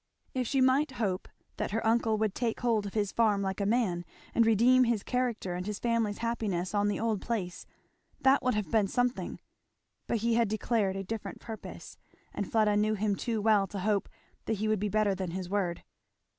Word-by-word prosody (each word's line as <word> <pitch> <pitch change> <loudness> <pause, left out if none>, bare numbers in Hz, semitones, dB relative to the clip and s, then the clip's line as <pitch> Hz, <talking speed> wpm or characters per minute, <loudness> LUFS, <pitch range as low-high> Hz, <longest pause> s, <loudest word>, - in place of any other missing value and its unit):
If 255 -2 -1
she 270 +2 +1
might 265 +2 +3
hope 200 -7 -2 0.3
that - - -2
her 225 +3 -2
uncle 225 -1 +2
would 215 -2 0
take 230 -3 -2
hold 225 -4 +1
of 200 - -9
his 205 -2 0
farm 210 -4 +2
like 190 +1 -2
a 200 - +1
man, 205 -7 +1 0.3
and 230 -1 +4
redeem 245 +4 +5
his 230 -4 0
character 245 -7 -1
and 180 +2 -4
his 210 -1 -3
family's 230 -3 0
happiness 205 -6 -1
on 205 0 +2
the 205 - -1
old 220 -3 0
place, 195 -7 -3 0.5
that 270 +1 +4
would 255 -3 +1
have 210 -2 -2
been 215 -3 +3
something; 245 +4 -1 0.7
but 235 - +1
he 235 - +3
had 230 0 +3
declared 215 -2 0
a 195 - -3
different 220 +2 -5
purpose, 225 -2 -9 0.3
and 205 - -4
Fleda 215 -2 +3
knew 215 +1 +2
him 205 0 0
too 225 0 -2
well 210 -3 +4
to 200 - -7
hope 200 0 0 0.4
that - - 0
he 215 +1 -1
would 215 -2 +1
be 210 +1 -1
better 210 -1 +2
than 190 -2 -3
his 180 +1 -5
word. 185 -4 -1
215 Hz, 205 wpm, -30 LUFS, 200-230 Hz, 0.7 s, redeem